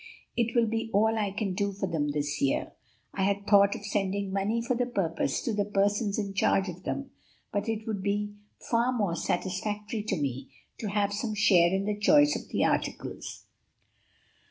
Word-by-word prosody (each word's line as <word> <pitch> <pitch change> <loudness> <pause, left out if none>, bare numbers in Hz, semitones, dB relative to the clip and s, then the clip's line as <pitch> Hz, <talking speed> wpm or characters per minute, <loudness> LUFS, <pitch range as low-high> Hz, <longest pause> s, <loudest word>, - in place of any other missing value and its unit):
It 235 0 0
will 235 -1 +5
be 225 +1 -2
all 220 +3 +3
I 210 -2 0
can 200 -1 -2
do 200 +2 0
for 195 0 -2
them 160 -5 -1
this 145 0 -2
year. 135 - 0 0.4
I 195 - -3
had 200 +1 +1
thought 200 -1 +5
of - - -8
sending 200 -1 -1
money 200 +4 0
for 235 +2 0
the 245 0 0
purpose, 165 - -1
to 230 - -1
the 205 -1 +1
persons 205 +1 +1
in 200 -2 -2
charge 195 0 +2
of 180 0 -8
them, 275 -1 -3 0.4
but 205 +2 -1
it 220 -1 -2
would 215 -3 -3
be 205 +1 -1 0.2
far 235 +2 +1
more 205 -9 0
satisfactory 210 +5 -2
to 215 - 0
me 135 -2 -3 0.3
to 220 - -3
have 200 0 +1
some 215 +1 -2
share 180 -4 +5
in 195 +1 0
the 210 0 0
choice 290 +7 +5
of - - -6
the - - +1
articles." - - -3
205 Hz, 190 wpm, -28 LUFS, 195-220 Hz, 0.4 s, will